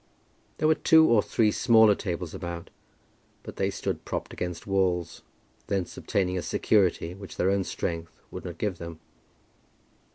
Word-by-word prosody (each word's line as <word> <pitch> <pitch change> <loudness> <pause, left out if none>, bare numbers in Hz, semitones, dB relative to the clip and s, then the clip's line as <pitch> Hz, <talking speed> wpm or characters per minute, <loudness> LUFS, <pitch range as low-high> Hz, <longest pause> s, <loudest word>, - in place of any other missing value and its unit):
There 155 - +2
were 160 - +6
two 160 0 +5
or 115 -3 +5
three 110 0 +2
smaller 110 -3 +5
tables 90 -4 -4
about, 85 -1 -6 0.7
but - - -9
they - - +1
stood - - -4
propped - - -4
against 90 -1 -5
walls, 95 -3 0 0.5
thence 95 -3 -2
obtaining 90 -2 -1
a - - -3
security 90 -5 +1
which 100 +1 -10
their 95 - +2
own 100 -1 +1
strength 85 -2 -4
would - - -7
not 85 -2 -7
give 100 -3 -2
them. 85 -1 -8
95 Hz, 155 wpm, -27 LUFS, 85-105 Hz, 0.7 s, were